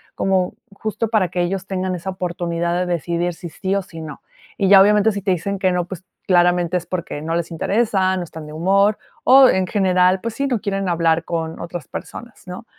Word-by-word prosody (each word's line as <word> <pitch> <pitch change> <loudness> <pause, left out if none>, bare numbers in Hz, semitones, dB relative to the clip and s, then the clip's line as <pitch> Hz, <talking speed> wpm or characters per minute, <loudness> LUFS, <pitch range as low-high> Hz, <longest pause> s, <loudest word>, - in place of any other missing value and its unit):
como 190 -2 0 0.2
justo 220 +2 -3
para 210 -5 +2
que 175 +1 -2
ellos 190 +2 -2
tengan 185 -1 -2
esa 180 +2 -6
oportunidad 175 -2 -2
de 180 - 0
decidir 175 +1 -1
si 170 0 -8
sí, 190 +5 -2
o 200 - +1
si 165 -3 -10
no. 155 -2 -8 0.4
Y 195 - +1
ya 195 0 +8
obviamente 210 +2 +4
si 200 - -4
te 195 - -3
dicen 195 +3 -2
que 185 -1 +2
no, 180 -1 0
pues, 185 0 -8 0.2
claramente 175 -1 +3
es 175 - -6
porque 175 -5 -4
no 165 +2 -2
les 170 0 -2
interesa, 190 +1 +1
no 180 - -2
están 160 -2 -9
de 150 - -10
humor, 195 +6 +2 0.3
o 265 +1 +8
en 190 -1 +1
general, 185 -1 +2
pues 230 +1 -4
sí, 275 +4 -1
no 245 -4 0
quieren 195 -2 -2
hablar 165 -1 +2
con 165 -1 -4
otras 170 -1 -7
personas, 240 -4 -9
¿no?, 180 +6 -8
185 Hz, 215 wpm, -20 LUFS, 170-195 Hz, 0.4 s, ya